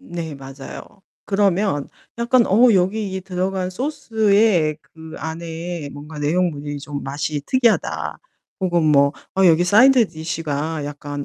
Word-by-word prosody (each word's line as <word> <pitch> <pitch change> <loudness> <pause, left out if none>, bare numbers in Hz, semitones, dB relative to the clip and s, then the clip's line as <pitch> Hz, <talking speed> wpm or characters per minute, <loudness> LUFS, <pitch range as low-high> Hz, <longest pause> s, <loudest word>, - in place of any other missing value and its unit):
네 170 - -6
맞아요. 135 +7 -11 0.2
그러면 195 -6 +1 0.3
약간 235 0 +3
'어 235 +5 +5
여기 195 +2 +1
이 190 - -3
들어간 185 0 -2
소스에 220 - +1
그 160 0 -13
안에 165 0 -5
뭔가 150 +2 -10
내용물이 150 -2 -1
좀 145 0 -6
맛이 145 +2 -3
특이하다.' 245 -4 +1 0.4
혹은 175 -3 +1
뭐 140 -2 +4 0.2
'어 190 0 +5
여기 170 0 +5
사이드 235 +4 +5
디시가 160 -2 -3
약간 145 0 -6
170 Hz, 260 characters per minute, -21 LUFS, 150-200 Hz, 0.4 s, 어